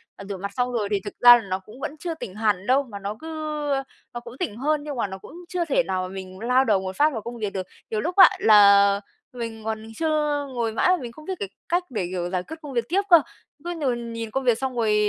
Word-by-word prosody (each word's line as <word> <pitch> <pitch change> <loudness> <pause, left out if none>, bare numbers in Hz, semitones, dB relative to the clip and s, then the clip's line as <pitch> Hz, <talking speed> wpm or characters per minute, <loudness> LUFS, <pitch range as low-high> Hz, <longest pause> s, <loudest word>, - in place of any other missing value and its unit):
ờ, 200 - -10
rửa 200 - -4
mặt 200 +2 -5
xong 250 0 +1
rồi 225 -4 -1
thì 205 - +2
thực 205 - -5
ra 245 0 +10
là - - -4
nó 185 0 -1
cũng 210 +6 -15
vẫn 275 - -5
chưa 340 -2 -3
tỉnh 240 -11 -8
hẳn 210 -3 0
đâu, 265 +3 +4
mà 215 -6 -9
nó 200 +1 -4
cứ, 320 - -9 0.4
ơ, 270 -1 0 0.3
nó 240 - -4
cũng 240 +1 -12
tỉnh 285 - -3
hơn 295 +3 0
nhưng 295 -1 -5
mà 235 - -1
nó 190 0 -7
cũng - - -14 0.2
chưa 355 -2 -1
thể 275 -4 +2
nào 185 -3 -2
mà - - -4
mình 190 -1 -8
lao 250 +4 +3
đầu 210 -5 +3
một 190 0 -5
phát 300 +6 +3
vào 225 - -4
công 235 +2 -7
việc 210 -3 -3
được. 185 -1 -4 0.2
Nhiều 215 -1 -1
lúc 355 +7 -3
á, 380 -2 +9
là 200 -2 +6 0.3
mình 230 -2 -6
còn 220 0 -3
chưa 300 -2 0
ngồi 235 -2 -1
mãi 225 - +2
mà 365 - +4
mình 240 -2 -6
không 305 +6 -14
biết 380 - -3
cái 200 - -4 0.2
cách 350 +1 +2
để, 210 -8 -2
kiểu, 175 -1 -2
giải 180 -1 -2
quyết 320 - -8
công 290 -3 -8
việc 235 -2 0
tiếp 385 +3 +2
cơ, 340 -3 +8 0.4
cứ 345 - -4
nhồi 270 -7 -1
nhìn 230 -1 -6
công 270 +4 -1
việc 240 -3 +3
xong 265 0 -3
rồi 220 -2 +2
235 Hz, 280 wpm, -24 LUFS, 200-280 Hz, 0.4 s, ra